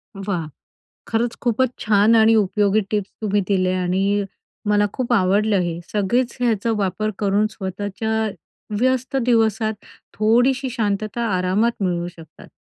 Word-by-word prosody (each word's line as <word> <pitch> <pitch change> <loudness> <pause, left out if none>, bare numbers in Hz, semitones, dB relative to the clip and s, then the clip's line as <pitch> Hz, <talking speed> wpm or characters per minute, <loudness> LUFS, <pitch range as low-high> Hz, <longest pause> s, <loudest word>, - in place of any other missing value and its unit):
वाह! 190 -5 -3 0.6
खरंच 230 +1 -1
खूपच 245 +1 +1
छान 215 +1 +4
आणि 225 0 +5
उपयोगी 205 0 +2
टिप्स 205 -2 -1
तुम्ही 205 -1 +1
दिल्या 185 -2 +1
आणि 195 +3 +1 0.5
मला 205 0 +3
खूप 250 -1 -1
आवडलं 200 0 +3
हे. 170 -1 -3
सगळेच 235 +5 0
याचा 230 -2 +1
वापर 205 +2 -1
करून 205 +1 +2
स्वतःच्या 205 +3 -4 0.7
व्यस्त 260 +2 0
दिवसात 220 -2 +2 0.4
थोडीशी 245 +5 +2
शांतता 215 -1 -2
आरामात 195 +6 +1
मिळवू 175 -1 -1
शकतात. 165 -3 -13
210 Hz, 125 wpm, -21 LUFS, 195-230 Hz, 0.7 s, आणि